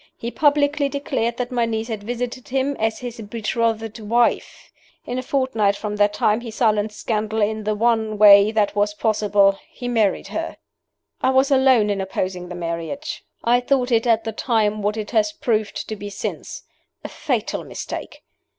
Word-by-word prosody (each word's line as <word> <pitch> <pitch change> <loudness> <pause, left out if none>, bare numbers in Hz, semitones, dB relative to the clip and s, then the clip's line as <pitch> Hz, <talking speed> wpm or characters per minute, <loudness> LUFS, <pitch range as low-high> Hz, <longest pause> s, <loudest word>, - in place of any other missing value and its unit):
He 235 - -5
publicly 290 0 +2
declared 270 -5 -2
that 250 0 -3
my 240 -2 +1
niece 220 0 -2
had 220 -3 -4
visited 245 +3 -5
him 270 +2 0
as 220 0 0
his 245 -2 -7
betrothed 225 +1 -2
wife. 230 +3 0 0.3
In 250 +1 -3
a - - -2
fortnight 250 -7 +1
from 210 0 -4
that 205 0 +3
time 210 +2 +2
he 235 - -7
silenced 215 -2 0
scandal 220 -1 -1
in 215 0 0
the 215 0 0
one 220 -1 +1
way 200 0 +8
that 210 -2 +1
was 205 0 +1
possible 205 -2 +2
he 245 - -7
married 225 -5 +1
her. - - -4 0.6
"I - - +3
was 265 +1 +3
alone 260 -6 +4
in 195 -1 -1
opposing 185 -1 -3
the 180 - -6
marriage. 170 - -5 0.2
I 240 +1 +4
thought 250 0 0
it 230 +1 +2
at 225 -1 +3
the 225 - -3
time 215 -2 0
what 210 +2 -1
it 215 -1 -5
has 215 -3 +2
proved 215 -2 -2
to 215 - -4
be 205 0 -7
since 200 - -6 0.4
a - - -4
fatal - - -2
mistake. - - -7
220 Hz, 180 wpm, -21 LUFS, 210-245 Hz, 0.6 s, way